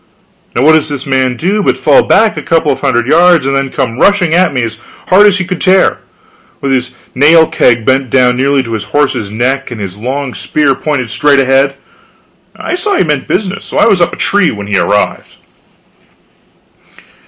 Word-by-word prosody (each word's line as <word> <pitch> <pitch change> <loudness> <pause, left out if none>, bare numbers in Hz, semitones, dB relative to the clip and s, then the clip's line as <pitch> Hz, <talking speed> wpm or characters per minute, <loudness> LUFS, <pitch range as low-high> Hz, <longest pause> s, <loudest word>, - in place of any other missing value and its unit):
Now 120 - 0
what 155 +2 +5
does 155 -1 +1
this 140 -2 -5
man 130 -2 -1
do 200 +5 -1
but - - 0
fall - - +3
back 220 - +2
a - - -5
couple 165 -3 0
of 135 - -3
hundred 120 -2 0
yards 170 +1 +3
and 135 0 -1
then 135 0 -1
come 125 -1 -4
rushing 190 -5 +2
at 180 -1 +2
me 125 -3 -2
as 115 -1 -5 0.3
hard 200 +3 +5
as 205 -1 +2
he 185 - -3
could 185 -2 -5
tear, 190 0 +2 0.6
with 135 - -3
his 125 -1 -1 0.2
nail 160 +5 +4
keg 115 -6 +1
bent 130 -1 0
down 125 -1 +2
nearly 135 +1 0
to 115 -2 -7
his 105 -2 -4
horse's 125 -2 -1
neck 125 +6 -2
and 120 -3 -8
his 100 -1 -7
long 130 +3 -4
spear 150 -3 0
pointed 130 -5 -3
straight 145 -1 +2
ahead. 135 +1 +1 0.8
I - - -5
saw 395 +3 -1
he - - +2
meant 150 -5 -2
business, 195 0 -3
so - - -6
I - - +4
was 200 -6 +2
up 170 - +2
the - - -10
tree 200 -4 +1
when 100 -1 -6
he 100 0 -3
arrived. 105 0 -2
140 Hz, 200 wpm, -11 LUFS, 125-170 Hz, 0.8 s, what